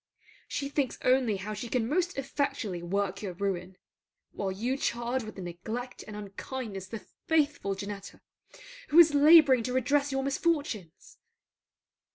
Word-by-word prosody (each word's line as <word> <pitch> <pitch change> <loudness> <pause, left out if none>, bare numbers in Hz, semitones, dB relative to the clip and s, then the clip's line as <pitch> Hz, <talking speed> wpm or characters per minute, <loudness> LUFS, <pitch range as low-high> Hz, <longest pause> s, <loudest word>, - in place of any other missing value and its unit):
She 280 - -3
thinks 280 -3 -1
only 255 -4 +3
how 205 +3 -5
she 215 +3 -6
can 235 -2 0
most 350 +5 0
effectually 275 -9 -2
work 195 +2 -2
your 195 -4 -4
ruin; 185 -1 -3 0.5
while 195 -2 -3
you 235 +7 -1
charge 240 -1 -1
with 215 -2 -9
neglect 195 +8 -6
and 215 - -8
unkindness 205 0 -6
the 220 +3 -8 0.2
faithful 290 -10 +1
Janetta, 200 0 -7 0.7
who 305 - +2
is 325 -3 +9
labouring 290 -3 +7
to 250 +2 -3
redress 280 +3 +2
your 270 0 -1
misfortunes. 275 - -2
235 Hz, 140 wpm, -29 LUFS, 200-280 Hz, 0.7 s, is